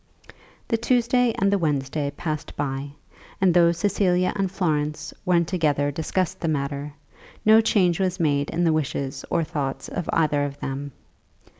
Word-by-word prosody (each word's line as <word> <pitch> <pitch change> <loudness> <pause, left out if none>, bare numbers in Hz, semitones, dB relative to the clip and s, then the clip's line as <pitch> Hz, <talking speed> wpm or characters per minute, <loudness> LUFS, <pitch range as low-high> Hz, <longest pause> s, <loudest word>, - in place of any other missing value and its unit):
The 230 - +2
Tuesday 245 +1 +2
and 195 +1 +2
the 200 - +2
Wednesday 145 -2 -1
passed 155 -3 -4
by, 140 0 -3 0.5
and 190 -2 +4
though 170 -1 +5
Cecilia 185 0 +1
and 195 -2 -1
Florence 155 -4 -1
when 175 -2 +3
together 150 -5 +1
discussed 160 +4 -2
the 165 - -2
matter, 140 -1 -2 0.5
no 220 +1 +7
change 185 -6 +2
was 185 0 0
made 145 -3 +1
in 175 - -1
the 165 -2 +3
wishes 140 -3 -2
or 170 - +1
thoughts 140 -4 -4
of 175 - -4
either 150 -3 +2
of 145 0 -4
them. 140 +1 -4
160 Hz, 155 wpm, -24 LUFS, 145-185 Hz, 0.5 s, no